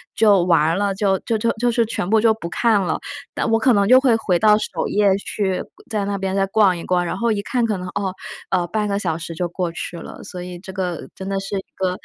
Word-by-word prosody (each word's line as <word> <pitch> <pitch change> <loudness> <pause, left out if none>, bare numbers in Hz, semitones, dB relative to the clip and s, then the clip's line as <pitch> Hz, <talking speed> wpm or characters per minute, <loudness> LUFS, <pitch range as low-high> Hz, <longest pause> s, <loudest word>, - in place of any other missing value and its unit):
就 205 -4 +5
完 165 -1 +3
了， 200 0 0
就 195 -1 +2
就 225 -2 -1
就 230 +2 +1
就 240 +2 0
是 235 0 +2
全 215 -4 -3
部 220 +1 +4
就 225 0 +4
不 195 -6 -7
看 220 +2 +2
了， 175 -4 -1 0.3
但 - - -1
我 225 - +5
可 255 +2 +4
能 200 -2 +3
就 255 +2 +8
会 255 -4 +4
回 185 -5 +1
到 210 +1 +5
首 - - -3
页 200 -2 +3
去， 195 -2 -2 0.3
在 210 -3 -1
那 200 0 -2
边 190 0 -2
再 195 0 +2
逛 195 -2 +3
一 170 - -7
逛， 180 -1 +1
然 175 - -3
后 235 +2 +1
一 205 -2 0
看 240 +3 0
可 215 -3 -1
能 180 0 -6
哦， 195 -1 -3 0.4
呃， 180 -2 +1
0.5 210 +2 -1
个 200 0 -1
小 160 -5 -1
时 165 0 -6
就 175 +2 -1
过 175 0 -3
去 170 +1 -6
了。 - - -10
所 180 - -8
以 180 -1 -8
这 190 +1 -10
个 180 -4 -3
真 190 - -7
的 195 0 -1
是 195 +1 -4
一 190 - -5
个， 185 -1 -1
195 Hz, 280 characters per minute, -21 LUFS, 180-215 Hz, 0.4 s, 就